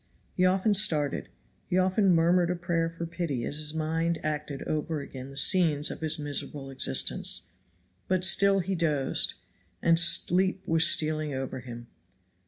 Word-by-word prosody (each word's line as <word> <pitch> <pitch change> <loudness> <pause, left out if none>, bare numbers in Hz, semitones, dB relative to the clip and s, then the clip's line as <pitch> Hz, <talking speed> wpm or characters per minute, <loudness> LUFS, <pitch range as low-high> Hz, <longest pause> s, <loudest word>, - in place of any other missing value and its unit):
He 185 0 +3
often 190 +3 +2
started, 155 -8 +1 0.4
he 180 - -1
often 185 0 +3
murmured 170 +1 +2
a 180 - 0
prayer 170 -1 -1
for 165 0 -7
pity 165 -7 -4
as 145 - -4
his 150 -1 -3
mind 165 +1 -1
acted 150 -2 -4
over 155 0 -3
again 135 -1 -9
the 135 - -11
scenes 150 -1 +3
of - - -9
his 160 0 -1
miserable 145 -1 -6
existence; 130 - 0 0.6
but 185 -1 +2
still 195 +1 +4
he 190 +2 -3
dozed, 150 -6 +1 0.4
and 165 0 +3
sleep 180 +3 +2
was 165 0 +4
stealing 155 -2 0
over 130 0 -5
him. 120 -1 -10
165 Hz, 155 wpm, -27 LUFS, 145-180 Hz, 0.6 s, still